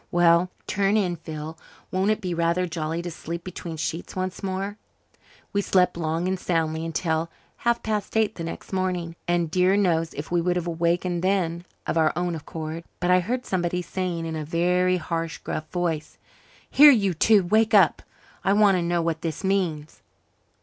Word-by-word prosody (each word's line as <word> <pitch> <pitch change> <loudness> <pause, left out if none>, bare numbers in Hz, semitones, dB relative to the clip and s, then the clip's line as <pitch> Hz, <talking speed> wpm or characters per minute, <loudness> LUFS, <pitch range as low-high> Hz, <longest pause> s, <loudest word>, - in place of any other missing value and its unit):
Well, 175 +1 +4 0.2
turn 200 +1 +1
in, 180 -4 +1
Phil. 160 0 -7 0.3
Won't 190 +2 +1
it 215 +1 +1
be 180 -3 -2
rather 170 +2 +1
jolly 165 0 -3
to 175 - -4
sleep 170 +1 -6
between 170 -3 -7
sheets 165 +2 -4
once 185 0 -3
more?" 195 +2 -3 0.8
We 200 - +2
slept 180 -2 +2
long 165 +1 -1
and 190 0 -1
soundly 160 -2 -1
until 165 0 -1 0.3
half 235 0 0
past 215 0 -2
eight 220 -1 +2
the 170 - -6
next 165 - -7
morning; 180 -3 -1
and 175 -2 +1
dear 185 +3 +3
knows 165 -5 +1
if 145 +3 -6
we 175 -1 +2
would 175 +1 +1
have 175 -1 -1
wakened 170 +1 0
then 180 -3 0 0.2
of 165 - 0
our 155 -1 +4
own 175 0 -1
accord. 160 +1 -6 0.2
But 175 +1 +1
I 180 - +6
heard 245 +8 -2
somebody 180 -1 -1
saying 175 -2 -3
in 160 0 -4
a 155 - -3
very 180 +3 +2
harsh, 165 -2 -3
gruff 155 0 -5
voice, 170 -4 -2 0.5
"Here, 295 +2 +8
you 200 -9 +4
two, 205 +5 +4
wake 220 +4 +3
up! 190 -6 +5 0.4
I 195 - +3
want 205 -2 +5
to - - 0
know 170 0 0
what 165 -1 -1
this 165 0 -4
means." 175 -6 -1
175 Hz, 185 wpm, -25 LUFS, 165-190 Hz, 0.8 s, Here